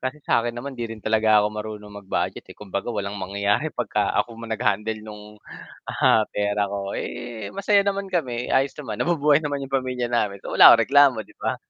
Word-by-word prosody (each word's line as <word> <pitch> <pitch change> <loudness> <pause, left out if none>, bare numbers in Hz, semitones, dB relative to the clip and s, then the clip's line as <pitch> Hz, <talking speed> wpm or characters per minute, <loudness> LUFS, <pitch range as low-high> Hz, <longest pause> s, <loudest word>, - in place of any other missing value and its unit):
kasi 130 +3 -3
sa'kin 115 0 +1
naman 135 +4 -6
hindi 120 -3 -5
rin 110 - -16
talaga 110 -1 +3
ako 105 - -2
marunong 105 -1 -7
mag-budget, 95 - -3
eh. - - -11
Kumbaga 100 +1 -5
walang 100 -3 -4
mangyayari 100 +8 0
'pagka 105 -7 -1
ako 120 - 0
ma 115 - -8
nag-handle 110 -1 -1
nung, 105 0 -11 0.5
ah, 110 -1 +3
pera 105 0 -1
ko. 100 0 -4
Eh, 115 -4 -6
masaya 200 +1 +3
naman 200 -1 -2
kami, 125 -9 -2
ayos 135 +1 +1
naman, 120 -8 -7
nabubuhay 150 -3 +3
naman 145 -2 -3
yung 135 - -9
pamilya 125 -2 -3
namin, 105 -4 -1
so - - -6
wala - - +8
akong 115 - +4
reklamo, 135 -4 +4
di - - -20
ba? - - -1
110 Hz, 195 wpm, -23 LUFS, 105-135 Hz, 0.5 s, wala